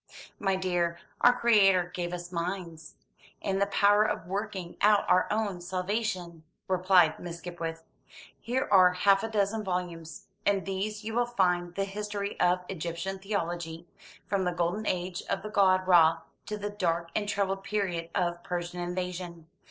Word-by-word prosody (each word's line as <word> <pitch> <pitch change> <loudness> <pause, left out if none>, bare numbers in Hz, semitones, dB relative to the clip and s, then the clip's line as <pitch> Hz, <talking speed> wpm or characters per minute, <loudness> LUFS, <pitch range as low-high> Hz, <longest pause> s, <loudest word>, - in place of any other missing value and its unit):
"My 195 -1 +1
dear, 175 -2 0 0.2
our 245 - +8
Creator 195 -6 +4
gave 175 -1 -3
us 175 0 -6
minds, 170 -2 -5 0.4
and 195 0 -1
the 200 - +3
power 205 +1 +4
of 215 - -2
working 195 -2 -4
out 205 0 +4
our 180 - +4
own 210 -4 -1
salvation," 185 -2 -3 0.3
replied 185 -3 +4
Miss 170 -1 -6
Skipwith. 165 -1 -6 0.6
"Here 255 +3 -1
are 185 -2 +7
half 195 +2 +4
a 225 - -2
dozen 215 0 0
volumes. 175 -4 -4 0.2
In 200 -2 +2
these 205 +2 -3
you 220 +1 -4
will 240 +1 +1
find 180 -6 0
the 195 - 0
history 205 0 -4
of 180 +1 +2
Egyptian 175 +2 -4
theology, 175 -4 -3 0.4
from 195 -2 0
the 180 - 0
golden 175 +5 -1
age 180 0 -2
of - - -1
the 215 - -5
god 185 -3 +4
Râ 165 -3 +5 0.3
to 210 - -3
the 205 0 -4
dark 170 -4 -1
and 205 -1 -1
troubled 195 -1 -1
period 180 -6 -2
of 175 -1 0
Persian 175 0 -4
invasion. 175 -1 -4
185 Hz, 160 wpm, -29 LUFS, 175-200 Hz, 0.6 s, our